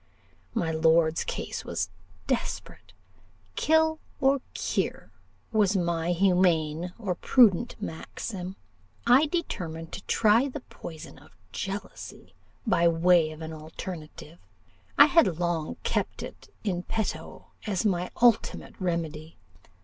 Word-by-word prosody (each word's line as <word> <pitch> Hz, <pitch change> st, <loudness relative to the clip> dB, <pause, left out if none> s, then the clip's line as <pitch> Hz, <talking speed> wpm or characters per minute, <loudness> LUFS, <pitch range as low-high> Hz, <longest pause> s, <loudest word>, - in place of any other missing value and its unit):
My 170 Hz, -7 st, 0 dB
lord's 160 Hz, 0 st, +3 dB
case -, -, -4 dB
was 95 Hz, -2 st, -3 dB, 0.3 s
desperate. 90 Hz, -, -3 dB, 0.6 s
Kill 320 Hz, 0 st, +3 dB, 0.2 s
or 270 Hz, -1 st, +3 dB
cure -, -, -2 dB, 0.4 s
was 210 Hz, -3 st, +3 dB
my 170 Hz, -1 st, 0 dB
humane 175 Hz, -3 st, +2 dB
or 205 Hz, -6 st, -2 dB
prudent 235 Hz, +2 st, +4 dB
maxim. 185 Hz, 0 st, -6 dB, 0.5 s
I 255 Hz, +6 st, +6 dB
determined 165 Hz, -, -4 dB
to 195 Hz, -, -7 dB
try 225 Hz, +4 st, +4 dB
the 280 Hz, +1 st, -6 dB
poison 160 Hz, -8 st, -10 dB
of -, -, -20 dB
jealousy, 195 Hz, +1 st, -6 dB, 0.3 s
by 170 Hz, -6 st, +3 dB
way 170 Hz, -1 st, +4 dB
of 155 Hz, +1 st, -9 dB
an 160 Hz, 0 st, -6 dB
alterative. 160 Hz, +1 st, -8 dB, 0.6 s
I -, -, +10 dB
had 290 Hz, -, +4 dB
long 170 Hz, -3 st, -1 dB
kept -, -, -1 dB
it -, -, -10 dB
in 185 Hz, -5 st, -1 dB
petto 180 Hz, -6 st, -4 dB, 0.2 s
as 200 Hz, -1 st, 0 dB
my 180 Hz, -3 st, +1 dB
ultimate 235 Hz, -3 st, +3 dB
remedy. 165 Hz, -3 st, -3 dB
180 Hz, 115 wpm, -27 LUFS, 160-215 Hz, 0.6 s, I